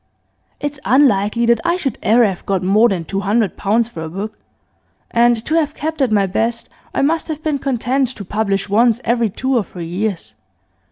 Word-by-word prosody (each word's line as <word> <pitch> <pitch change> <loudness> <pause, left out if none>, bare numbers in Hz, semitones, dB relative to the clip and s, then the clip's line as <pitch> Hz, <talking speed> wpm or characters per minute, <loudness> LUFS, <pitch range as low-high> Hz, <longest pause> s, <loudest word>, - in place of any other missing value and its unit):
'It's 290 -1 -4
unlikely 235 -2 +3
that 235 0 +3
I 340 +1 +1
should 295 -7 -3
ever 230 +3 +4
have 190 -4 -3
got 190 -2 0
more 210 +5 +4
than 180 -5 -2
two 195 +4 -3
hundred 205 +1 0
pounds 220 +3 +1
for 170 -9 -8
a 160 - -5
book; 200 +6 -5 0.8
and, 240 +1 +4
to 315 - -2
have 310 -2 +1
kept 315 0 -3
at 260 -4 +2
my 205 -2 +3
best, 225 +5 -2 0.2
I - - 0
must 320 +3 +1
have 310 -1 -5
been 300 -3 0
content 265 0 0
to 200 - -8
publish 200 0 -1
once 230 +3 +3
every 235 -1 +1
two 260 +7 -2
or 235 - +2
three 175 -3 -8
years. 175 - -3
230 Hz, 200 wpm, -18 LUFS, 195-265 Hz, 0.8 s, ever